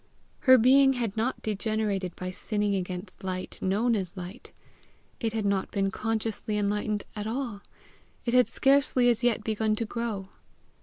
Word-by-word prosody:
Her 260 - +10
being 270 +3 +6
had 235 -5 -2
not 230 +4 -1
degenerated 210 -3 -1
by 185 0 -5
sinning 205 +2 -1
against 185 0 -5
light 185 -1 -5
known 220 +5 +2
as 190 -2 -3
light; 185 +6 -8 0.7
it 225 -2 -1
had 220 -2 -1
not 200 -1 0
been 195 -1 0
consciously 220 0 -2
enlightened 210 0 0
at 210 0 -4
all; 230 -3 -3 0.6
it 235 - 0
had 250 -1 +5
scarcely 270 -2 +3
as 235 +1 -2
yet 240 -2 +2
begun 220 0 0
to 230 - -2
grow. 215 -4 -4
215 Hz, 155 wpm, -28 LUFS, 195-235 Hz, 0.7 s, Her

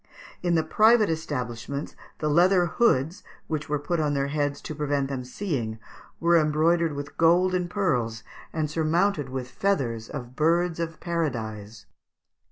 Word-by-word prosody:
In 175 -1 +1
the 160 - +3
private 220 -1 +4
establishments 140 -3 -4 0.2
the 155 - -2
leather 175 +4 +4
hoods, 170 - +1 0.2
which 155 -1 -4
were 150 - +1
put 160 +4 -2
on 150 -2 +1
their 140 0 0
heads 145 -1 -1
to - - -6
prevent 145 -2 -1
them 135 -2 -3
seeing, 125 - -3 0.4
were 170 0 +4
embroidered 160 +2 +2
with 140 0 -7
gold 175 +3 +4
and 180 -1 0
pearls 125 - -1 0.3
and 155 -2 -1
surmounted 160 0 +1
with 130 -1 -5
the - - -22
feathers 125 - 0
of 125 -1 -7
birds 170 +3 +2
of 165 -1 -4
paradise. 115 - -3
155 Hz, 155 wpm, -26 LUFS, 135-170 Hz, 0.4 s, private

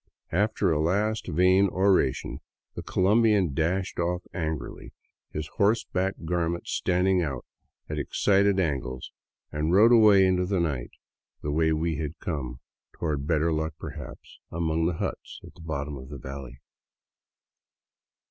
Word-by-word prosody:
After 100 0 +1
a 75 - +1
last 105 +5 0
vain 95 +4 +4
oration 95 -8 +1 0.3
the - - -6
Colombian 100 -4 +2
dashed 90 +6 -1
off 90 +1 -1
angrily, 80 -4 -5 0.4
his 75 0 -4
horseback 100 -2 +1
garments 85 0 -2
standing 90 +1 +2
out 70 -7 -3 0.4
at 75 -1 -3
excited 100 +6 +2
angles, 65 -7 -2 0.4
and 75 +3 -1
rode 110 +5 +6
away 105 -5 +7
into 90 -1 +1
the 95 -1 0
night 70 -8 -2 0.5
the 75 - -2
way 80 +1 +2
we 80 0 0
had 75 +2 -4
come, 65 -7 -5 0.3
toward 75 -4 -3
better 80 0 +2
luck 80 0 -2
perhaps - - -9
among 80 -1 0
the 90 - 0
huts - - -5
at - - -13
the - - -16
bottom 75 -3 -4
of 65 0 -10
the 70 - -7
valley. 65 -1 -9
85 Hz, 140 wpm, -27 LUFS, 75-95 Hz, 0.5 s, away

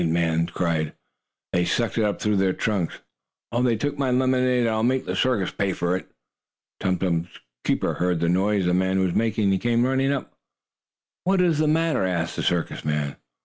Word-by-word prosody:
the - - +1
man 85 0 +1
cried. 85 -3 -1 0.6
"They 90 - +3
sucked 100 +6 0
it - - +3
up 105 -1 0
through 105 -1 +1
their 95 -1 +2
trunks. 100 -6 -1 0.6
Oh, 120 - 0
they 125 -2 +3
took 145 +6 -3
my 135 -2 +1
lemonade, 125 0 +2
and 115 - +2
I'll 110 0 0
make 130 +3 +1
the - - -3
circus 115 -8 +1
pay 100 -2 -1
for 90 0 0
it!" 95 - -5 0.7
Tum 95 -1 0
Tum's 85 -2 0 0.4
keeper - - 0
heard 90 -1 0
the 85 - +1
noise 95 +2 +2
the 90 - +2
man 95 +1 +1
was 95 -2 +1
making, 110 -3 +1
and 95 - 0
came 120 0 +2
running 135 +1 +1
up. 140 - -3 0.9
"What 190 +1 +2
is 170 -4 +3
the 155 - +2
matter?" 160 -4 +2
asked 85 -2 -1
the - - -2
circus 85 -2 -1
man. 75 -2 -1
100 Hz, 200 wpm, -24 LUFS, 90-125 Hz, 0.9 s, They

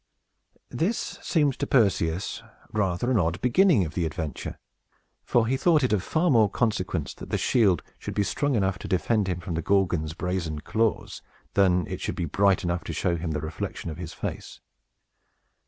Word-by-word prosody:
This 200 +8 -2
seemed 145 -6 +1
to - - -1
Perseus 95 -8 +1 0.3
rather 105 +3 0
an 120 - +3
odd 85 +1 0
beginning 125 - +4
of 75 - -7
the 85 0 0
adventure; 80 -3 -5 0.7
for 120 -2 +2
he 125 +4 +1
thought 155 0 +3
it 125 - +2
of 100 - +2
far 160 - +1
more 110 -5 +5
consequence 95 - -1
that - - -10
the - - 0
shield 100 -9 +3 0.2
should - - -6
be 100 - +2
strong 135 +8 0
enough 95 -4 0
to - - -7
defend 100 +3 +1
him 90 -1 -2
from 85 0 -5
the 80 - -1
Gorgon's 90 -5 +1
brazen 90 -4 -2
claws, 110 +7 -1 0.3
than 90 -3 +3
that - - -9
it - - -4
should - - -3
be 85 - -2
bright 100 +5 +2
enough 85 0 -1
to - - -4
show 90 -2 0
him 85 0 -4
the 75 -2 -2
reflection 80 +1 -5
of 75 - -8
his 85 -3 -6
face. - - -6
95 Hz, 190 wpm, -26 LUFS, 85-115 Hz, 0.7 s, more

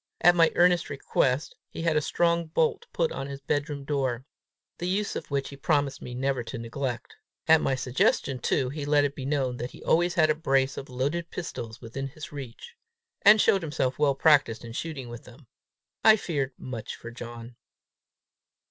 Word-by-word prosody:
At 175 - +7
my 165 -1 +5
earnest 175 -1 +4
request, 135 -1 0
he 165 - -6
had 165 -2 +2
a 150 - +3
strong 170 +2 +1
bolt 160 0 0
put 165 -2 0
on 135 0 -4
his 140 -1 -7
bedroom 145 +1 -2
door, 130 -4 -1 0.5
the 175 - -2
use 200 +3 -1
of - - -5
which 140 -1 -1
he 140 - -9
promised 140 -1 0
me 125 - -7
never 135 0 0
to 120 +3 -6
neglect. 120 +1 -5 0.3
At 160 -1 +6
my 135 - +1
suggestion 130 +1 +1
too, 125 +2 0
he 145 +2 -5
let 145 0 +3
it 140 -1 0
be 135 -1 -5
known 135 -4 0
that 120 +1 -4
he - - -13
had - - -14
always 175 +2 +2
a 155 -2 +5
brace 135 -3 +1
of 135 - -7
loaded 145 +7 -2
pistols 120 -9 -6
within 130 +4 -5
his 155 +3 -10
reach, 140 - -9 0.5
and 210 +2 +8
showed 195 -1 +4
himself 145 -5 -2
well 145 -2 +3
practiced 135 -6 +3
in 115 - -8
shooting 140 -2 -5
with 120 0 -9
them. 125 +3 -15 0.6
I 220 -1 +8
feared 140 -10 -2
much 115 -4 -6
for 115 - -9
John. 120 0 -9
140 Hz, 190 wpm, -27 LUFS, 125-160 Hz, 0.6 s, and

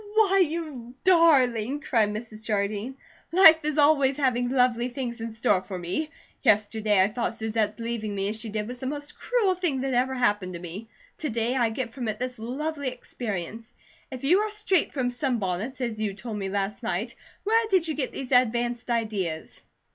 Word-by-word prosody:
"Why, 395 -3 +4
you 300 -7 -5
darling!" 285 - +4
cried 225 -7 +2
Mrs. 215 0 -6
Jardine. 215 +3 -2 0.3
"Life 330 -3 +8
is 305 0 -1
always 285 -2 +4
having 245 -3 +1
lovely 250 -1 +2
things 245 -2 -5
in 230 - -3
store 220 -4 +1
for 185 0 -7
me. 180 - -3 0.3
Yesterday 210 0 +3
I - - +3
thought 225 +2 -2
Susette's 220 -1 -1
leaving 230 -3 -3
me 195 0 -1
as 215 - -3
she 220 - -5
did 210 0 -3
was 250 +1 -7
the 260 - -4
most 290 +1 -6
cruel 455 -6 +2
thing 345 -8 -1
that 270 -1 -1
ever 255 +2 +1
happened 205 -7 +1
to 170 - -6
me. 180 +6 -8 0.3
To 305 - -2
day 235 +2 0
I 240 -3 +2
get 230 +1 -4
from 250 -4 -4
it 215 -1 -2
this 250 -1 -4
lovely 285 +5 -3
experience. 225 -4 -5 0.4
If 260 -1 -8
you 345 +8 +4
are 430 +1 0
straight 415 -4 +1
from 255 -3 -1
sunbonnets, 240 - -2
as 225 -3 -2
you 205 -3 -1
told 220 0 -6
me 195 -1 -3
last 200 +2 -2
night, 230 +1 -2 0.3
where 450 +2 +2
did 370 -4 +3
you 315 - -1
get 285 -4 -2
these 265 -1 -7
advanced 240 -1 +2
ideas?" 205 -9 -2
240 Hz, 190 wpm, -26 LUFS, 215-280 Hz, 0.4 s, Life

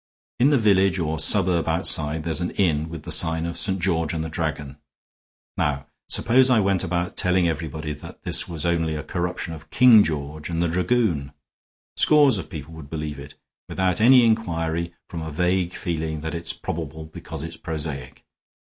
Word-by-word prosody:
In 130 +4 +5
the 145 - +4
village 95 -4 +3
or 80 -2 -2
suburb 90 0 +2
outside 75 +1 +1
there's 85 +1 -1
an 90 - -1
inn 80 -5 +1
with 80 -2 -8
the - - -6
sign 80 0 +3
of 85 0 -4
St. 95 -1 0
George 85 -2 0
and 80 - -2
the 80 - -5
Dragon. 75 -3 -4 0.8
Now 70 -1 -1 0.2
suppose 130 +3 +4
I 125 -3 +4
went 95 -2 +1
about 90 -1 -2
telling 90 -1 +2
everybody 80 -1 -4
that - - -12
this - - +1
was 80 -2 -3
only 80 -2 0
a 75 - -5
corruption 90 +1 -4
of 80 -1 -12
King 120 -1 +7
George 75 0 -4
and 85 -1 -2
the 85 - +1
Dragoon. 85 - 0 0.6
Scores 145 -8 +5
of 80 - -8
people 75 0 -8
would 80 -3 -11
believe 75 -2 -5
it, 70 0 -11 0.3
without 95 +2 0
any 125 +1 +7
inquiry, 85 -6 -1
from 85 - -6
a 80 - -5
vague 90 +3 0
feeling 80 -3 -3
that 80 +1 -5
it's 85 0 -2
probable 80 -1 -6
because 80 -2 -8
it's 80 0 -7
prosaic. 75 -6 -6
85 Hz, 180 wpm, -23 LUFS, 80-95 Hz, 0.8 s, King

